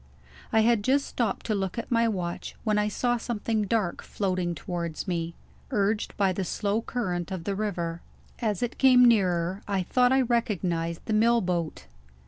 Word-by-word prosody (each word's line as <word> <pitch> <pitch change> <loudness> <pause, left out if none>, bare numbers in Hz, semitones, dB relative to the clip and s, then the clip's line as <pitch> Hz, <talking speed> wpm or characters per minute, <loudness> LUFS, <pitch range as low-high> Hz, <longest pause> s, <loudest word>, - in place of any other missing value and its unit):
I 220 - +4
had 225 -2 +3
just 275 +4 +2
stopped 230 -5 -2
to 220 - 0
look 195 -1 -2
at 230 - -5
my 230 -1 +3
watch, 180 -5 -3
when 215 -2 +2
I 210 - +1
saw 240 +3 0
something 225 -2 -1
dark 205 -5 0
floating 185 -3 -2
towards 170 +1 -4
me, 170 -2 -2 0.3
urged 210 +1 0
by 195 -2 +2
the 190 - -2
slow 205 +4 -1
current 185 -8 -3
of 185 -3 -4
the 200 - -2
river. 175 -5 -3 0.4
As 215 -3 -1
it 240 - -3
came 255 -2 +7
nearer, 185 -4 +2
I 195 -2 0
thought 250 +6 +3
I 265 0 +4
recognized 185 -9 -1
the 220 - -1
mill 230 +2 +4
boat. 170 - -2
205 Hz, 175 wpm, -27 LUFS, 175-230 Hz, 0.4 s, came